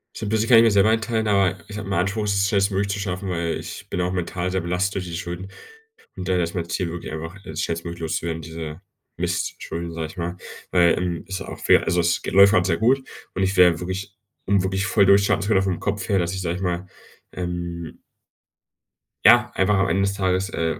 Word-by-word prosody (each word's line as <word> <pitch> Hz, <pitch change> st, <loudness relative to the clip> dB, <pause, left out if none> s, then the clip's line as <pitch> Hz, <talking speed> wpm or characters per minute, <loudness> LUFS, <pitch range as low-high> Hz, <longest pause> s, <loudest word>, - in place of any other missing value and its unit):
So -, -, -5 dB
'n -, -, -3 dB
bisschen 110 Hz, +1 st, 0 dB
kann 120 Hz, -, +8 dB
ich 115 Hz, -, +8 dB
mir 115 Hz, -, +4 dB
selber 100 Hz, +1 st, +4 dB
einteilen, 110 Hz, 0 st, 0 dB
aber 100 Hz, -2 st, +2 dB
ich 105 Hz, -, -7 dB
habe 105 Hz, -2 st, -6 dB
den 100 Hz, -, -2 dB
Anspruch, 100 Hz, +4 st, 0 dB
es 100 Hz, -1 st, +1 dB
schnellstmöglich 100 Hz, 0 st, +1 dB
zu 100 Hz, -, -3 dB
schaffen, 95 Hz, -1 st, -3 dB
weil 85 Hz, -2 st, -1 dB
ich -, -, -8 dB
bin 90 Hz, -, -2 dB
auch 90 Hz, +1 st, 0 dB
mental 90 Hz, 0 st, -2 dB
sehr 95 Hz, 0 st, 0 dB
belastet 90 Hz, +3 st, -1 dB
durch 95 Hz, -, -2 dB
die 85 Hz, -1 st, -6 dB
Schulden 90 Hz, +2 st, -6 dB, 0.7 s
und 90 Hz, -2 st, -6 dB
daher 90 Hz, -2 st, +2 dB
ist 85 Hz, +2 st, -4 dB
mein 85 Hz, -2 st, -2 dB
Ziel 90 Hz, -1 st, -1 dB
wirklich 85 Hz, -1 st, -6 dB
einfach, 80 Hz, +3 st, -6 dB
es 80 Hz, 0 st, -4 dB
schnellstmöglich 85 Hz, +1 st, -4 dB
loszuwerden, 80 Hz, 0 st, -2 dB
diese 80 Hz, 0 st, -7 dB, 0.4 s
Mistschulden, 85 Hz, 0 st, -3 dB
sage 80 Hz, -1 st, -3 dB
ich 75 Hz, -, -14 dB
mal, 85 Hz, +1 st, -3 dB, 0.3 s
weil, 85 Hz, -2 st, +4 dB
ähm, 90 Hz, -2 st, -2 dB
ist 95 Hz, -1 st, -4 dB
auch -, -, -8 dB
fair. -, -, +4 dB
Also, 85 Hz, -, +1 dB
es 85 Hz, 0 st, +2 dB
läuft 100 Hz, +1 st, +6 dB
grad 90 Hz, -3 st, +3 dB
sehr 85 Hz, -, +1 dB
gut 130 Hz, +4 st, +2 dB, 0.3 s
und 95 Hz, -, 0 dB
ich 95 Hz, +1 st, 0 dB
wär 90 Hz, -2 st, +6 dB
wirklich 95 Hz, +3 st, -5 dB, 0.3 s
um 100 Hz, -1 st, +2 dB
wirklich 95 Hz, +1 st, -1 dB
voll 100 Hz, -1 st, +4 dB
durchzustarten, 100 Hz, +1 st, +4 dB
vor 110 Hz, -, +2 dB
allem 95 Hz, -, +4 dB
vom 95 Hz, -3 st, -1 dB
Kopf 100 Hz, -1 st, -3 dB
her, 100 Hz, -, +3 dB
dass 85 Hz, 0 st, -1 dB
ich, 95 Hz, -, -3 dB
sage 85 Hz, -1 st, -2 dB
ich 95 Hz, -, -6 dB
mal, 90 Hz, 0 st, -2 dB, 0.4 s
ähm 85 Hz, -2 st, -5 dB, 1.2 s
Ja, -, -, +7 dB
einfach 95 Hz, +2 st, +2 dB
am 95 Hz, 0 st, +2 dB
Ende 95 Hz, +4 st, +2 dB
des 100 Hz, 0 st, 0 dB
Tages, 95 Hz, 0 st, 0 dB
äh, 80 Hz, -3 st, -2 dB
95 Hz, 230 wpm, -23 LUFS, 85-100 Hz, 1.2 s, kann